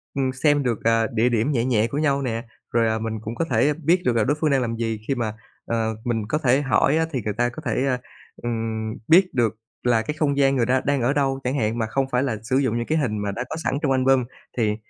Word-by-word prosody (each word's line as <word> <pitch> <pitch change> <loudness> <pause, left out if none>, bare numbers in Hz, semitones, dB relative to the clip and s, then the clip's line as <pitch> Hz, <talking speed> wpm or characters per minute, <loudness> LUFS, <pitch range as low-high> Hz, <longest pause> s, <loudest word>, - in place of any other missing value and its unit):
ừm, 135 -1 0
xem 145 +2 +2
được, 120 -4 -1
à, 115 0 +3
địa 115 +2 +3
điểm 120 +4 +1
nhẹ 120 -4 +1
nhẹ 115 -3 +2
của 140 - -4
nhau 140 -2 +1
nè, 115 -3 -2 0.3
rồi, 115 -1 +2
à, 110 0 0
mình 110 0 -3
cũng 110 +2 -6
có 165 - -1
thể 135 +1 +2
biết 165 +4 +1
được 125 - +2
là 115 - +3
đối 145 +7 +1
phương 155 - +2
đang 135 -1 +3
làm 115 -2 -2
gì, 115 -1 -2
khi 135 - +1
mà 115 -4 -2 0.4
ờ, 110 -1 0
mình 115 -3 0
có 150 - +1
thể 135 -2 +2
hỏi 140 +2 +2
á 160 - +2
thì 135 - -1
người 105 - -2
ta 120 +3 +1
có 120 - -9
thể, 130 - 0
ờ, 125 - +1 0.5
ừm, 110 -2 -2
biết 180 +3 +5
được 115 -4 +1 0.3
là 120 -2 +3
cái 150 - -3
không 140 -2 +1
gian 135 -1 +3
người 120 -3 +2
ta 130 +2 +2
đang 140 -1 +1
ở 125 +4 +2
đâu 135 -2 0
chẳng 125 +2 -1
hạn 110 -1 0
mà 115 - 0
không 135 +4 0
phải 125 +1 +2
là 120 -6 -1
sử 130 +3 0
dụng 130 -4 +1
những 120 - -2
cái 155 - 0
hình 125 -8 0
mà 105 -1 -2
đã 110 +5 -3
có - - -4
sẵn - - 0
trong 145 - +1
album, 130 0 +3 0.3
thì 110 -3 +1
125 Hz, 280 wpm, -23 LUFS, 115-140 Hz, 0.5 s, biết